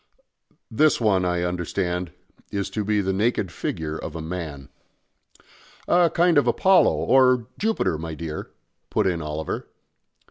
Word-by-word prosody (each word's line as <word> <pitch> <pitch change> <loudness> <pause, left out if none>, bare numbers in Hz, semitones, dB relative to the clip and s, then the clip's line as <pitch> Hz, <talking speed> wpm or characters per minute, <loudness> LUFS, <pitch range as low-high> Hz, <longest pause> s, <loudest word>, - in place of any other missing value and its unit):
"This 155 0 +3
one, 100 -5 +2
I 90 -1 0
understand, 90 0 -2 0.4
is 100 -1 -3
to 105 - -2
be 105 0 +1
the 95 0 -1
naked 100 -2 0
figure 80 -1 -4
of 80 - -6
a - - -4
man." 80 -4 -6 1.2
"A 175 -1 +4
kind 170 -2 +4
of - - 0
Apollo 190 -1 +4
or 130 -2 +3
Jupiter, 215 - 0
my 80 -1 -5
dear," 80 -1 -6 0.4
put - - +1
in 90 -3 0
Oliver. 75 +1 -4
90 Hz, 140 wpm, -24 LUFS, 80-120 Hz, 1.2 s, A